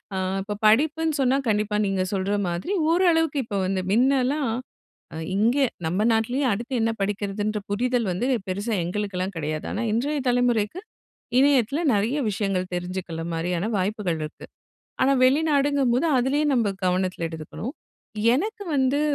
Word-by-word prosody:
அ - - -1 0.3
இப்ப 205 0 -5
படிப்புன்னு 310 +6 +2
சொன்னா 260 +1 +3
கண்டிப்பா 210 0 0
நீங்க 195 -1 0
சொல்ற 195 +1 0 0.2
மாதிரி 175 - -3 0.2
ஓரளவுக்கு 330 -3 +3
இப்போ 205 -3 -3
வந்து 190 -1 0
மின்னலாம் 260 +3 +2 0.6
அ - - -6 0.2
இங்கே 240 +7 +3 0.2
நம்ம 180 +5 0
நாட்லயே 245 +5 +1
அடுத்து 235 +6 -3
என்ன 225 - +2
படிக்கிறதுன்ற 205 +1 -2
புரிதல் 245 +3 0
வந்து 185 +8 -1 0.2
பெருசா 205 +5 -2
எங்களுக்கெல்லாம் 190 -1 -3
கிடையாது. 155 0 -3
ஆனா 210 - -2
இன்றைய 285 +6 0
தலைமுறைக்கு 245 - +1 0.6
இணையத்தில 275 +1 +3
நிறைய 215 +7 +1
விஷயங்கள் 195 -2 -2
தெரிஞ்சுக்கிற 180 -2 -4
மாரியான 175 +4 -1
வாய்ப்புகள் 190 -3 -1
இருக்கு. 155 0 -7 0.6
ஆனா 270 +1 +4
வெளிநாடுங்கும்போது 280 -1 +2
அதிலயு 275 +5 +1
நம்ம 225 -5 +1
கவனத்தில 180 -2 0
எடுத்துக்கணும். 165 - -7 0.6
எனக்கு 420 - -2
வந்து 265 +2 +2
220 Hz, 130 wpm, -24 LUFS, 190-270 Hz, 0.6 s, ஆனா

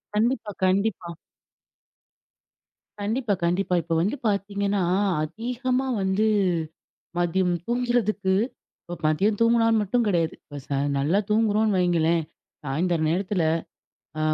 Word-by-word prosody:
கண்டிப்பா, 225 0 0
கண்டிப்பா. 185 -2 0 1.9
கண்டிப்பா. 220 +2 -1
கண்டிப்பா. 180 +1 +1
இப்ப 165 +1 -3
வந்து 200 +10 0
பார்த்தீங்கன்னா, 200 -1 0 0.4
அதிகமா 250 - -2
வந்து, 190 +3 +1 0.9
மதியம் 175 +1 +1
தூங்கிறதுக்கு 240 -5 0 0.5
இப்போ 175 - -7
மதியம் 195 +7 +2
தூங்கினா 230 0 +4 0.2
மட்டும் 235 +4 +1
கிடையாது. 170 -6 +1
இப்போ 145 -1 -10
ச - - -37 0.3
நல்லா 150 +8 +2
தூங்குறோம்ன்னு 215 -1 +2
வைங்களேன். 170 -2 +2 0.4
சாயந்தர 165 +4 0
நேரத்துல, 185 0 0 0.8
அ - - -2
200 Hz, 100 wpm, -25 LUFS, 175-220 Hz, 1.9 s, தூங்கினா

